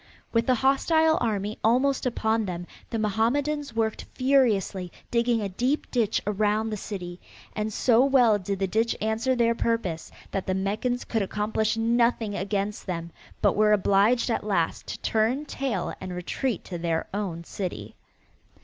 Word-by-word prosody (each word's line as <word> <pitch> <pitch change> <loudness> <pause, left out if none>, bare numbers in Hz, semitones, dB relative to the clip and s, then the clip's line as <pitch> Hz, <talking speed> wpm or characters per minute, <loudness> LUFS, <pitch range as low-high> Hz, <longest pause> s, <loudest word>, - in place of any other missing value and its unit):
With 230 0 +2
the 255 - +4
hostile 315 +5 +3
army 210 -2 -1
almost 255 +4 +2
upon 225 -2 0
them 175 -2 -4 0.2
the 230 - -2
Mohammedans 240 +6 0
worked 220 -1 -1
furiously 225 -9 +2 0.2
digging 235 -1 +2
a 200 - -2
deep 250 +10 -1
ditch 225 -4 +1
around 210 +2 +1
the - - -1
city, 180 -4 -6 0.4
and 215 0 -2
so 235 +3 +4
well 250 -6 +4
did 195 +1 -3
the 195 - 0
ditch 225 +5 +1
answer 220 +4 0
their 235 -1 +3
purpose 230 -9 -2 0.2
that 195 - -3
the 185 - +1
Meccans 215 +6 -1
could 225 - -1
accomplish 215 +2 -1
nothing 230 -1 +2
against 200 +1 -2
them, 170 -2 -4 0.3
but - - +4
were 210 0 +4
obliged 210 +5 +3
at - - -1
last 190 -6 -1
to - - -5
turn 230 +7 +1
tail 275 -3 -2
and 185 -1 -5
retreat 205 +5 -2
to 175 -2 -6
their 165 -1 -1
own 185 -5 -3
city. 185 +1 -5
220 Hz, 160 wpm, -26 LUFS, 195-240 Hz, 0.4 s, the